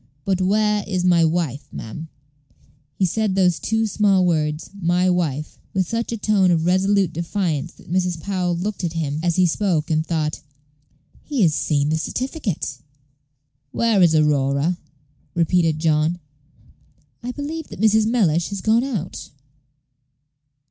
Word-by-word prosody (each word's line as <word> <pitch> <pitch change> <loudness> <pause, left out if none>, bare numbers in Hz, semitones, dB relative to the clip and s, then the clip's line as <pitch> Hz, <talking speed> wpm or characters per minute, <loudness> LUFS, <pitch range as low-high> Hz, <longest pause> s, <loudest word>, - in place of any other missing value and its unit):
"But 190 -1 0
where 210 +2 +2
is 185 -3 -1
my 175 -2 +4
wife, 155 -5 -1
ma'am?" 135 +9 -7 0.9
He 190 - +1
said 205 +2 0
those 180 -3 +3
two 225 0 0
small 200 -3 +2
words, 155 -3 -1
"my 180 +2 +2
wife," 155 -5 -2 0.2
with 185 -2 +1
such 230 +3 -2
a 230 - -2
tone 205 -3 +2
of 165 -2 +2
resolute 190 0 +2
defiance 170 -3 -2
that - - -15
Mrs. 180 -2 0
Powell 180 -1 -1
looked 195 +3 -4
at 170 -2 -1
him 155 -3 -2
as 170 -1 0
he 185 - +4
spoke, 170 -3 0
and 155 0 +2
thought, 155 -2 -2 0.8
"He 280 -8 0
has 160 -4 +4
seen 145 -1 0
the 160 +1 0
certificate." 230 - -3 0.9
"Where 225 +3 +2
is 170 -3 +5
Aurora?" 150 +2 +2 0.6
repeated 165 -2 +2
John. 155 +1 +1 1.0
"I 245 +1 -4
believe 300 +4 -5
that - - -11
Mrs. 220 0 +4
Mellish 175 -8 +2
has 200 -2 -5
gone 225 +4 +3
out." 215 - -5
180 Hz, 145 wpm, -21 LUFS, 160-205 Hz, 1.0 s, is